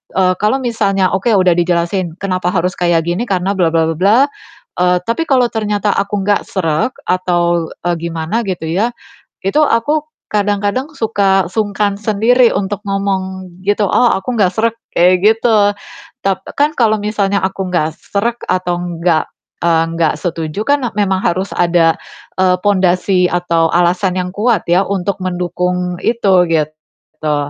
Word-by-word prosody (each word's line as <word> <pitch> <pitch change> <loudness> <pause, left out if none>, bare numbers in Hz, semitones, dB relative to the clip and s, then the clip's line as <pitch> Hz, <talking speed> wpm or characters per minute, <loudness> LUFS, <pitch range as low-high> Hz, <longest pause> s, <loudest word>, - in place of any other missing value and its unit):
Eee, 185 -1 +3
kalau 215 +6 +2
misalnya 200 -6 0
oke 195 +5 -1
udah 185 -3 +4
dijelasin 175 0 0
kenapa 185 -2 -1
harus 180 0 0
kayak 170 -2 +1
gini, 175 +7 -1
karena 190 +1 0
bla 170 -3 +3
bla 160 -1 +2
bla 165 - -2
bla, 200 +6 +4 0.6
eee, 180 0 +3
tapi 235 +8 0
kalau 255 -3 +4
ternyata 210 -2 -1
aku 200 0 -1
nggak 205 - +2
srek 165 +5 0 0.2
atau, 175 -2 0 0.2
eee, 175 - +1
gimana 170 +7 -2
gitu 180 -4 -4
ya, 210 +8 0 0.5
itu 195 +10 +2
aku 295 +4 +1 0.3
kadang-kadang 205 +7 -1
suka 195 -4 +1
sungkan 205 -1 0
sendiri 230 +4 +3
untuk 200 +1 -2
ngomong 190 -1 -2 0.2
gitu, 205 0 +1
"Oh 245 - +3
aku 215 +6 -2
nggak 190 -3 +3
srek" 230 +1 +1 0.2
kayak 180 +2 +5
gitu. 220 -1 +4 0.5
Tap 195 -1 -1 0.2
kan 300 +2 +3
kalau 220 -3 +3
misalnya 200 -1 0
aku 190 -1 -2
nggak 160 -2 0
srek 235 +4 -3
atau 180 -1 0
enggak, 170 -2 -1 0.3
eee, 165 -1 +3
enggak 165 -1 +1
setuju 165 +2 -3
kan 285 -2 +2
e - - -6
memang 190 -2 +1
harus 185 +3 -1
ada, 170 -2 +3 0.5
eee, 180 -1 +3
pondasi 185 -2 +2
atau 170 -2 +1
alasan 180 +2 +1
yang 180 0 -3
kuat 220 -2 +1
ya 180 +3 +4
untuk 200 0 -1
mendukung 180 0 -2
itu 195 -6 +3
gitu. 155 0 -3
190 Hz, 155 wpm, -15 LUFS, 175-210 Hz, 0.6 s, kayak